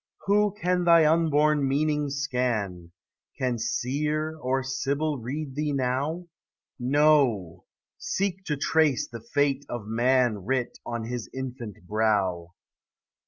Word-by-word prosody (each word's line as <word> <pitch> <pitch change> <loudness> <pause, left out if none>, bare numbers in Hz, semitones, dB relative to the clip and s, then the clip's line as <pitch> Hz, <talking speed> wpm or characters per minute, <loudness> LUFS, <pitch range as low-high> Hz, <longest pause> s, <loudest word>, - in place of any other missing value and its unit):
Who 205 +1 +3
can 180 0 +1
thy 170 -2 +6
unborn 150 -2 +3
meaning 150 +1 +1
scan? 120 - -2 0.5
Can 125 -3 -1
Seer 150 +7 -1
or 130 0 0
Sibyl 140 +2 -1
read 135 +4 -5
thee 150 +1 -1
now? 140 +6 -1 0.5
No, 130 - +2 0.3
seek 190 -1 -2
to 150 -3 -1
trace 150 -1 +2
the 115 -2 -9
fate 140 +4 0
of 120 -4 -5
man 120 0 +2
Writ 130 +3 -2
on 115 -1 -3
his 120 0 -5
infant 125 -8 -7
brow. 95 -5 0
135 Hz, 120 wpm, -26 LUFS, 120-150 Hz, 0.5 s, thy